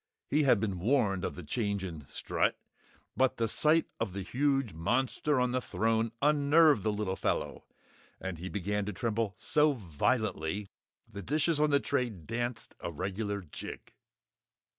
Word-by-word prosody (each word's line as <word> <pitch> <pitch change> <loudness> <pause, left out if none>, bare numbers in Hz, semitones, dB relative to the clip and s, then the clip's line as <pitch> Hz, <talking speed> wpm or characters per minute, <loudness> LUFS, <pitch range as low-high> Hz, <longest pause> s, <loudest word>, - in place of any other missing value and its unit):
He 150 - +4
had 130 -7 +4
been 100 -4 -2
warned 100 -3 +2
of - - -2
the 90 - -8
change 100 - -1
in 80 -6 -7
Strut, - - 0 0.6
but 130 +1 +2
the 115 - +1
sight 155 +8 +3
of 90 - -2
the 100 0 -4
huge 135 - 0
monster 130 - +1
on 125 -1 +2
the 130 0 0
throne 115 0 0
unnerved 150 -2 +5
the 110 - +1
little 105 -2 -2
fellow - - -2 0.5
and 95 -4 -5
he 90 +2 -5
began 105 +1 -1
to 105 - -3
tremble 110 -1 -1
so 150 0 +3
violently, 90 - -1 0.4
the 105 -3 -8
dishes 150 - +1
on 150 0 +4
the 140 -1 +4
tray 130 -3 0
danced 115 +5 -4
a 85 - -4
regular 100 +5 -3
jig. 80 -5 -9
110 Hz, 160 wpm, -31 LUFS, 95-135 Hz, 0.6 s, unnerved